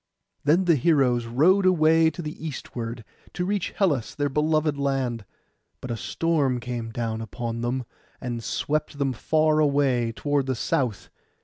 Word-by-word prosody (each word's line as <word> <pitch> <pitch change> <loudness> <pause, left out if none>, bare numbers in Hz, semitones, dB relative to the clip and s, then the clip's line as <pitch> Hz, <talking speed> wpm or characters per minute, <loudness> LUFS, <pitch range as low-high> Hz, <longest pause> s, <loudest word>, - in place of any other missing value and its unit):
Then 165 +6 +3
the 170 -3 +4
heroes 125 -5 +2
rowed 180 +11 +4
away 160 -2 +5
to 175 +2 -7
the 150 0 -4
eastward, 120 -6 -6 0.3
to 180 - -2
reach 200 -1 -1
Hellas, 145 - 0
their 145 -1 0
beloved 150 +1 +1
land; 135 -5 -1 0.5
but 125 - -6
a - - -1
storm 140 0 0
came 120 -1 -4
down 115 -1 -3
upon 115 +1 -4
them, 125 +1 -2 0.3
and 120 -3 -4
swept 150 +3 -2
them 140 -2 0
far 155 +5 +2
away 140 -5 +2
toward 145 +3 -1
the 130 - 0
south. 120 -2 -1
140 Hz, 150 wpm, -25 LUFS, 120-155 Hz, 0.5 s, away